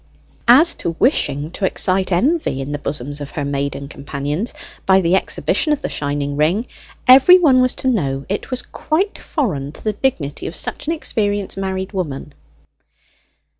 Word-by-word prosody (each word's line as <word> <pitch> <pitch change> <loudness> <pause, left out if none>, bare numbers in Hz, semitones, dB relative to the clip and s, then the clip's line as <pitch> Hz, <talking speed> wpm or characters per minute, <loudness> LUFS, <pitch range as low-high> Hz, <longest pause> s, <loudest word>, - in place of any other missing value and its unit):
As 295 +8 +7
to 165 - -2
wishing 155 - +1
to 195 - -7
excite 190 0 +1
envy 260 - +1
in 135 +1 -4
the 145 - -3
bosoms 145 0 -4
of 145 - -6
her 145 - -4
maiden 140 0 -3
companions, 145 - -4 0.4
by 190 0 +6
the 175 0 +2
exhibition 300 - 0
of 290 - -4
the - - -2
shining 145 0 -2
ring, 165 - +1 0.4
every 270 +8 +9
one 275 -8 +4
was 255 0 +2
to - - -4
know 140 - 0
it 200 - -4
was 255 -1 -3
quite 370 +7 -2
foreign 150 - -2
to - - -14
the 215 - 0
dignity 185 - -2
of 165 - -6
such - - -3
an 325 - +1
experienced 205 - -1
married 190 0 -3
woman. 150 -6 -4
190 Hz, 170 wpm, -19 LUFS, -, 0.4 s, every